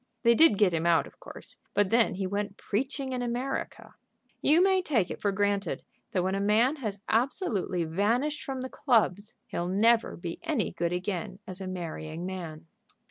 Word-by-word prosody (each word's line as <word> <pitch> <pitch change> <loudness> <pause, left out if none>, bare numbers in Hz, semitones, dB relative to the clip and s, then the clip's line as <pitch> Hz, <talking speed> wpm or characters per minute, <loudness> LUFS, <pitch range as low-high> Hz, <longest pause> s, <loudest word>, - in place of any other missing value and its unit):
They 235 - +6
did 300 -6 +6
get 190 -4 +4
him 165 +1 0
out, 170 -1 +4
of - - -16
course, - - -12 0.2
but 205 -2 +2
then 230 -3 +3
he 190 +1 -2
went 200 +1 -3
preaching 265 +4 -2
in 250 - -2
America. 245 +3 -3 0.5
You 310 +3 +5
may 380 -1 +4
take 235 - 0
it - - -7
for 200 - +1
granted, 200 -2 -1 0.3
that 185 - 0
when 190 +1 0
a 195 - 0
man 220 +8 +3
has 210 -7 -4
absolutely 225 - 0
vanished 225 - 0
from 265 -1 -4
the 260 - -3
clubs, 215 -7 +1
he'll 175 - -3
never 225 +5 +3
be 170 -1 -6
any 270 - -1
good 170 0 -2
again 185 +2 -3
as 185 +1 -7
a 190 - -4
marrying 170 -2 -5
man." 170 -5 -6
205 Hz, 185 wpm, -28 LUFS, 185-245 Hz, 0.5 s, They